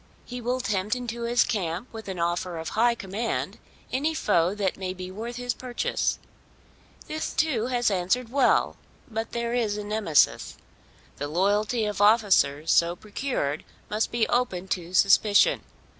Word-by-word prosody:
He 245 0 -7
will 250 +2 -1
tempt 200 +1 -1
into 235 -1 -4
his 240 +1 +3
camp 195 -3 -2
with 220 -2 -9
an 190 -2 -5
offer 175 +1 -1
of 160 0 -4
high 235 +2 +2
command 215 +2 -3 0.3
any 305 +5 0
foe 180 - +2
that 200 -3 -1
may 185 -1 -4
be 185 0 -7
worth 230 +5 -6
his 245 0 -2
purchase. 250 -1 -2 0.9
This 310 0 -4
too 260 -8 0
has 245 -3 +1
answered 195 +6 0
well; 275 +1 +2 0.3
but 225 +1 -3
there 235 0 -2
is 220 -4 0
a 210 - -4
Nemesis. 205 -8 +1 0.6
The 145 - -3
loyalty 205 +7 +1
of 210 -1 -2
officers 200 -9 +4
so 170 +1 +3
procured 205 - -3 0.3
must 215 +1 0
be 235 -2 +1
open 190 -7 0
to 175 0 -3
suspicion. 200 +2 +5
210 Hz, 155 wpm, -26 LUFS, 185-240 Hz, 0.9 s, suspicion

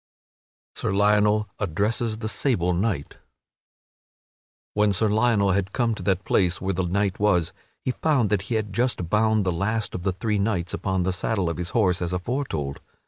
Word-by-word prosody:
[Sidenote: - - -8
Sir - - 0
Lionel 105 +1 +3
addresses 110 +4 -1
the 110 -1 -4
sable 100 -7 +1
knight] 90 -5 -2 1.6
When 105 -1 +3
Sir 110 +3 +2
Lionel 105 -2 +3
had 95 0 -1
come 120 -2 +1
to - - -7
that 95 -1 0
place 90 -1 +2
where 95 0 -1
the 95 0 -1
knight 100 +1 0
was, 95 -6 +2 0.3
he 130 - +1
found 130 -6 +1
that 105 -2 +2
he 115 - 0
had 105 -2 -2
just 115 -7 -1
bound 110 -1 +3
the 90 - +1
last 110 +5 -1
of 90 - -4
the 95 +1 0
three 105 +2 -1
knights 100 -4 -1
upon 95 -2 -1
the 95 +1 0
saddle 95 -2 0
of - - -6
his 90 0 -3
horse 95 -7 +2
as 90 0 -2
aforetold. 90 - -3
100 Hz, 185 wpm, -24 LUFS, 90-110 Hz, 1.6 s, Lionel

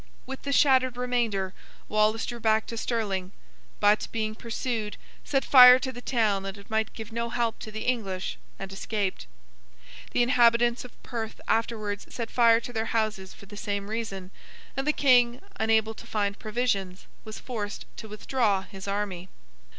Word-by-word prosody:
With 265 +1 -7
the 280 - -3
shattered 260 -3 +4
remainder, 230 -7 -1 0.3
Wallace 215 +1 +2
drew 240 -1 -5
back 220 -1 +2
to 230 - -6
Stirling; 205 -5 -2 0.5
but, 210 +1 +3
being 215 -1 -2
pursued, 225 -1 -4 0.3
set 270 -2 0
fire 250 -2 +10
to 260 0 -3
the 245 -1 -9
town 220 -6 +1
that 195 +1 -6
it 200 +2 -15
might 220 0 0
give 220 0 -8
no 235 +1 -2
help 235 -1 -1
to 215 - -8
the 220 +1 -5
English, 195 -7 -2 0.2
and 195 0 -7
escaped. 195 - -3 0.8
The 245 - +2
inhabitants 240 -1 +4
of 250 - -15
Perth 225 -3 -5
afterwards 215 -2 -1
set 230 -2 -5
fire 230 -2 +5
to 245 - -8
their 220 -1 -1
houses 215 -4 -2
for - - -14
the 205 +1 -12
same 200 0 -3
reason, 195 -5 -4 0.4
and 270 +2 -2
the - - +5
King, 250 -4 +4 0.2
unable 220 0 +2
to - - -13
find 200 -2 -1
provisions, 205 -5 -2 0.2
was 215 -1 -8
forced 215 -5 -5
to 220 - -8
withdraw 210 -2 0
his 195 0 -10
army. 200 -3 -3
220 Hz, 165 wpm, -27 LUFS, 205-240 Hz, 0.8 s, fire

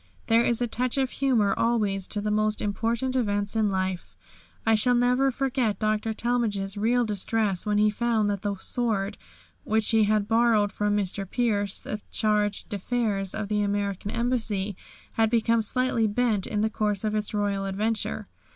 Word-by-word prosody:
There 230 +1 +4
is 235 0 +1
a - - 0
touch 250 +3 -1
of 265 -2 +1
humour 235 -8 +2
always 210 -5 0
to 205 - -3
the 210 0 -1
most 215 0 +1
important 230 +5 -1
events 205 -4 0
in 215 -2 +2
life. 190 -2 -3 0.5
I 225 - +4
shall 245 +3 +3
never 250 +3 +3
forget 260 -4 0
Dr. 215 0 0
Talmage's 220 -4 -1
real 235 +4 +2
distress 210 -1 0
when 210 0 +2
he 210 0 +4
found 225 -1 +1
that 200 -2 -1
the 205 -1 -2
sword 205 -1 -1 0.5
which 220 0 +1
he 220 -2 +4
had 210 -1 +1
borrowed 225 -2 +3
from 210 0 0
Mr. 195 -1 -2
Pierce, 205 -5 0
the 210 - -5
Charge 210 -1 0
d'Affaires 205 -2 -2
of 215 -1 -3
the 210 0 0
American 200 -1 -2
Embassy, 220 -4 -1 0.4
had 225 -1 +2
become 230 0 +2
slightly 235 0 0
bent 215 -2 0
in 210 -2 -1
the 220 - +2
course 210 -2 -1
of 215 -1 -1
its 210 -1 -2
royal 205 -2 -1
adventure. 210 +3 -2
215 Hz, 170 wpm, -26 LUFS, 205-235 Hz, 0.5 s, There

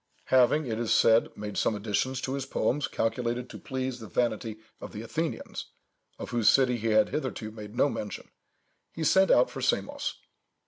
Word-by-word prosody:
Having, 130 +4 +5
it 115 -3 -3
is 120 -2 -1
said, 115 +1 +5
made 105 0 -5
some 110 - +1
additions 110 +5 -1
to 130 - -3
his 135 -1 -3
poems 145 +2 0
calculated 120 +2 -2
to - - -9
please 130 -1 -4
the 110 - -8
vanity 110 +1 -1 0.2
of - - -9
the 105 - -6
Athenians, 160 +7 -4 0.5
of - - -7
whose 120 -3 +4
city 125 -2 +4
he 115 0 -3
had 110 -1 +4
hitherto 130 -7 -3
made 105 0 -10
no 140 - +4
mention, 105 -7 -6 0.6
he 165 - -5
sent 190 +5 +4
out - - +5
for - - -6
Samos. - - -1
120 Hz, 180 wpm, -28 LUFS, 110-130 Hz, 0.6 s, Having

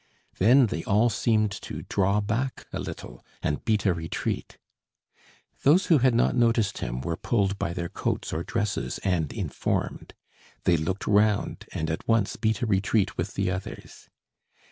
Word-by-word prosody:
Then 125 +7 +6
they 80 -7 -3
all 110 +4 +3
seemed 110 -1 +2
to - - -7
draw 100 +1 +1
back 115 +6 -2
a - - -2
little - - -7 0.2
and 75 - -1
beat 110 -2 +1
a 95 - +4
retreat. 80 -1 -4 1.0
Those 170 +8 +5
who 150 - +6
had 125 -1 +3
not 120 - +3
noticed 115 -4 +2
him - - -3
were 85 +4 -2
pulled 100 0 0
by 85 - -1
their 85 -1 -3
coats - - -3
or 80 - -1
dresses 115 -1 -2
and 85 -6 0
informed. - - -3 0.5
They 85 - +4
looked 85 +5 -2
round 105 0 +2
and 80 - -2
at 80 - -5
once 115 -3 +2
beat 110 -1 0
a - - +3
retreat 100 -1 +1
with 95 +4 -3
the 100 -2 0
others. 95 +1 -7
100 Hz, 165 wpm, -26 LUFS, 90-115 Hz, 1.0 s, Then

